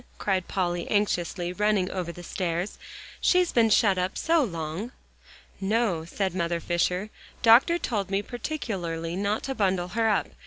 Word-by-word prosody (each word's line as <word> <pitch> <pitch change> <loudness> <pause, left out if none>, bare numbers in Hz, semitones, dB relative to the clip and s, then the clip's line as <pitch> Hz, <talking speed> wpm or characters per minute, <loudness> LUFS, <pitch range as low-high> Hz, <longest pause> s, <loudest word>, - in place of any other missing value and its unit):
cried 190 -3 -1
Polly 175 -2 -1
anxiously, 180 -3 0
running 205 -1 +1
over 180 -2 -3
the 175 +1 -11
stairs. 175 +2 -3 0.4
"She's 360 -1 +3
been 230 -2 +4
shut 200 -3 +4
up 180 +2 -2
so 325 -1 +3
long!" 170 +3 -4 0.7
"No," 195 -5 0
said 190 +2 -2
Mother 170 -2 -1
Fisher. 180 +4 -1 0.3
"Doctor 245 +9 +6
told 205 - -2
me 195 +1 0
particularly 190 - -4
not 200 +3 -1
to 270 - -2
bundle 190 -6 0
her 225 +3 +1
up. 205 - +1
195 Hz, 150 wpm, -26 LUFS, 175-220 Hz, 0.7 s, Doctor